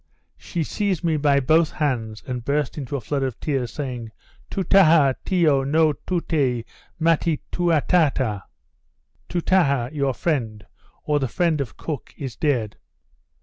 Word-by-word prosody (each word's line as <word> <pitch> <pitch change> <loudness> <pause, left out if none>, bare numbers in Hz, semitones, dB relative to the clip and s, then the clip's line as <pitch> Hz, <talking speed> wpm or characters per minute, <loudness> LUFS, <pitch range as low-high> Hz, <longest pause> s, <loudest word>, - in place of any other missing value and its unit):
She 170 -3 -4
seized 195 +1 -2
me 165 -2 +1
by 145 -1 +3
both 155 +4 +3
hands, 115 -8 -2
and 125 -2 -4
burst 140 +1 -1
into 140 -2 -5
a 135 - -3
flood 135 +6 -2
of 130 -3 -3
tears, 135 -6 -2
saying, 125 -6 -5 0.4
Toutaha 165 -7 +4
Tiyo 155 -7 +2
no 155 +2 +3
Toutee 140 -8 -1 0.3
matty 165 -1 +2
Toutaha 155 - +2 0.9
(Toutaha, 160 -8 +2
your 140 -3 0
friend, 115 -11 -2 0.4
or 150 -1 +1
the 135 - -1
friend 165 +1 0
of 130 - -6
Cook, 150 -6 -6
is 135 -4 -6
dead.) 125 - -1
145 Hz, 135 wpm, -23 LUFS, 130-165 Hz, 0.9 s, Toutaha